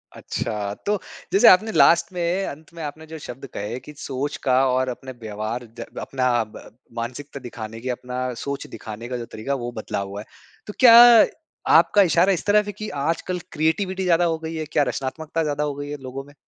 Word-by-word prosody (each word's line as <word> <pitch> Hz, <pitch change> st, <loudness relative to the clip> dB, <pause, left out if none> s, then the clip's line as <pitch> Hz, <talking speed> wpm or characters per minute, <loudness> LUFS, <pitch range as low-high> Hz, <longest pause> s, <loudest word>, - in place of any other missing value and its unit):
अच्छा। 105 Hz, -3 st, -3 dB
तो 205 Hz, -1 st, +1 dB, 0.3 s
जैसे 195 Hz, -, +6 dB
आपने 215 Hz, +4 st, +6 dB
लास्ट 170 Hz, +2 st, +5 dB
में 180 Hz, +2 st, 0 dB
अंत 155 Hz, +3 st, -9 dB
में 165 Hz, -, -9 dB
आपने 155 Hz, +2 st, -7 dB
जो -, -, -5 dB
शब्द 135 Hz, 0 st, -8 dB
कहे 110 Hz, +5 st, -4 dB
कि 150 Hz, -, -10 dB
सोच 140 Hz, +1 st, -3 dB
का 130 Hz, -2 st, +3 dB
और 130 Hz, 0 st, +1 dB
अपने 130 Hz, +1 st, -7 dB
व्यवहार 110 Hz, +3 st, -4 dB
ज़ा -, -, -5 dB, 0.2 s
अपना 130 Hz, -1 st, -1 dB
अ, -, -, 0 dB
ब 110 Hz, 0 st, -14 dB, 0.2 s
मानसिकता 135 Hz, +4 st, -5 dB
दिखाने 115 Hz, -1 st, -7 dB
की -, -, -1 dB
अपना 125 Hz, 0 st, -4 dB, 0.2 s
सोच 140 Hz, 0 st, -4 dB
दिखाने 110 Hz, +1 st, -8 dB
का 125 Hz, 0 st, -3 dB
जो 120 Hz, -, -5 dB
तरीका 110 Hz, +6 st, -4 dB
है -, -, -1 dB
वो 120 Hz, 0 st, -4 dB
बदला -, -, -3 dB
हुआ 100 Hz, +1 st, -6 dB
है। -, -, -12 dB, 0.4 s
तो 210 Hz, -, -6 dB
क्या 240 Hz, -3 st, +9 dB, 0.8 s
आपका 205 Hz, -, +5 dB
इशारा 185 Hz, +3 st, +4 dB
इस 175 Hz, -, -4 dB
तरफ 210 Hz, 0 st, +4 dB
है 205 Hz, -, -4 dB
की -, -, -4 dB, 0.2 s
आजकल 180 Hz, +2 st, -1 dB
क्रिएटिविटी 185 Hz, +5 st, 0 dB
ज़्यादा 175 Hz, -1 st, +3 dB
हो 165 Hz, -1 st, 0 dB
गयी 160 Hz, 0 st, -6 dB
है? 155 Hz, -, -3 dB
क्या 145 Hz, -, +3 dB
रचनात्मकता 160 Hz, +4 st, -3 dB
ज़्यादा 150 Hz, 0 st, -1 dB
हो 145 Hz, -1 st, -2 dB
गई 145 Hz, 0 st, -6 dB
है 145 Hz, -, -4 dB
लोगों 135 Hz, +2 st, -6 dB
में? 145 Hz, +1 st, -17 dB
145 Hz, 210 wpm, -23 LUFS, 125-170 Hz, 0.8 s, क्या